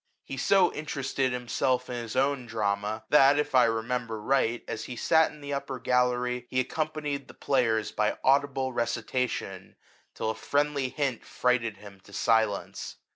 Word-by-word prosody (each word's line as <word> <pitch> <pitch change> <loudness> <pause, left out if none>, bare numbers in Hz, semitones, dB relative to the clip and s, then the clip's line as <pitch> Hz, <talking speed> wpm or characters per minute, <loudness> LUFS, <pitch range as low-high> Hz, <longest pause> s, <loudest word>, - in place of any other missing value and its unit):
He - - -6
so 185 +7 +3
interested 135 -3 -2
himself 125 +1 0
in 125 - -5
his 115 -1 -6
own 135 -1 +1
drama, 105 0 -1
that, 140 -1 +6
if 150 -1 -1
I 125 -2 +6
remember 115 0 -2
right, 120 0 +1
as - - -4
he 125 - -6
sat 160 +6 +3
in 150 - -14
the 145 0 -5
upper 140 -1 -3
gallery, 125 0 0
he 130 - 0
accompanied 150 0 -2
the - - -14
{layers 115 -5 +2
by 105 0 0
audible 135 -1 +2
recitation, 120 -4 -2 0.4
till 110 - -1
a - - -3
friendly 145 +1 0
hint 135 -4 -2
frighted 115 -4 0
him 100 -1 -13
to 100 +1 -18
silence. 110 0 0
125 Hz, 160 wpm, -28 LUFS, 115-140 Hz, 0.4 s, that